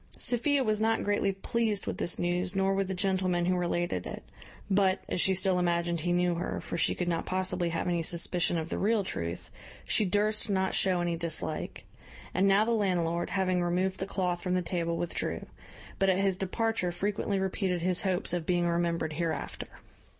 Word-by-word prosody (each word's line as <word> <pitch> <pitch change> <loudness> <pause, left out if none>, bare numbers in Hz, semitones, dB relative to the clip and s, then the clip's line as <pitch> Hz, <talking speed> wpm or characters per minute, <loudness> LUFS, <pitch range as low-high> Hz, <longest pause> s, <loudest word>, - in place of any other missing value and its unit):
Sophia 270 +3 +2
was 215 -2 +1
not 225 0 +2
greatly 205 -1 +1
pleased 210 +1 -1
with - - -4
this 170 - +2
news, 180 +2 -1
nor 195 0 +2
with 195 0 0
the 190 - -2
gentleman 185 -2 +1
who 185 +1 +2
related 175 0 -1
it; - - -7 0.4
but, 195 -1 +2
as 180 - 0
she 190 - +3
still 185 0 +2
imagined 170 -1 0
he 175 +3 -1
knew 175 0 +2
her 170 +1 -3
(for - - -6
she - - +1
could 180 - -2
not 170 -1 0
possibly 185 -2 0
have 165 +2 -2
any 175 -1 +1
suspicion 175 +1 +1
of 160 0 -3
the - - -2
real 215 0 +2
truth), 85 - -4 0.3
she - - +3
durst 210 +3 +1
not 190 -1 +1
show 185 -2 +2
any 175 -1 0
dislike. 160 -1 -3 0.5
And 190 +2 +3
now 200 +2 +5
the 235 - 0
landlord, 175 -6 0
having 185 -1 +1
removed 185 +2 0
the 190 - -3
cloth 180 -3 -1
from 180 0 -1
the 180 - 0
table, 170 -1 -1
withdrew; 175 - -2 0.5
but 195 - +3
at 185 - +3
his 195 -1 +2
departure 195 0 -1
frequently 200 +2 -1
repeated 190 -2 -1
his 180 0 +2
hopes 185 -2 0
of 175 -2 -2
being 175 -1 +2
remembered 170 -2 0
hereafter. 165 0 -3
185 Hz, 195 wpm, -29 LUFS, 175-195 Hz, 0.5 s, now